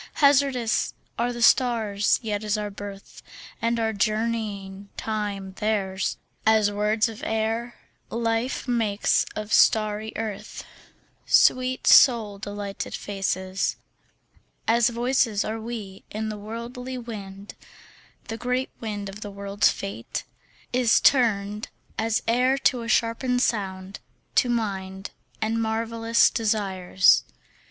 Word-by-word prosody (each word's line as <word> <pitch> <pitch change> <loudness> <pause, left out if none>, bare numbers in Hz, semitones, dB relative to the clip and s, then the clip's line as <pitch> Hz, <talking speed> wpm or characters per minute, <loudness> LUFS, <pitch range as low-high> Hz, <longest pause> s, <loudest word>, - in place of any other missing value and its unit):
Hazardous 275 -5 +2 0.2
are 240 +1 +1
the 240 -1 -3
stars, 220 -6 +3
yet 210 -1 -2
is 210 0 0
our 210 -1 -3
birth 200 0 -9 0.4
And 230 0 +1
our 220 -1 0
journeying 210 -2 -2
time 205 -3 -3
theirs; 200 -3 -1 0.3
As 220 -2 +4
words 210 +2 +1
of 225 -2 -8
air, 225 +2 -1 0.3
life 230 +3 -1
makes 225 -4 +1
of 215 0 -4
starry 215 0 +3
earth 215 -3 -5 0.6
Sweet 255 0 +3
soul 220 -6 +6
delighted 205 -1 -5
faces; 190 -1 -2 0.9
As 235 +1 +4
voices 235 -3 +1
are 220 +1 -3
we 220 -4 -7
in 220 +1 -3
the 215 - -5
worldly 240 +4 -6
wind; 205 -4 -8 0.7
The 225 - -4
great 250 +2 -1
wind 205 -3 -4
of 195 +2 -9
the 205 - -5
world's 200 0 +1
fate 195 -13 -5 0.5
Is 245 -2 +4
turned, 210 -5 +2 0.3
as 225 +1 0
air 250 +3 +3
to 255 -2 +2
a 230 - -6
shapen 240 +2 +1
sound, 195 -5 -2 0.3
to 250 - +3
mind 195 -4 -3 0.3
And 225 +1 0
marvellous 225 +1 +2
desires. 195 -5 +3
220 Hz, 115 wpm, -25 LUFS, 205-235 Hz, 0.9 s, soul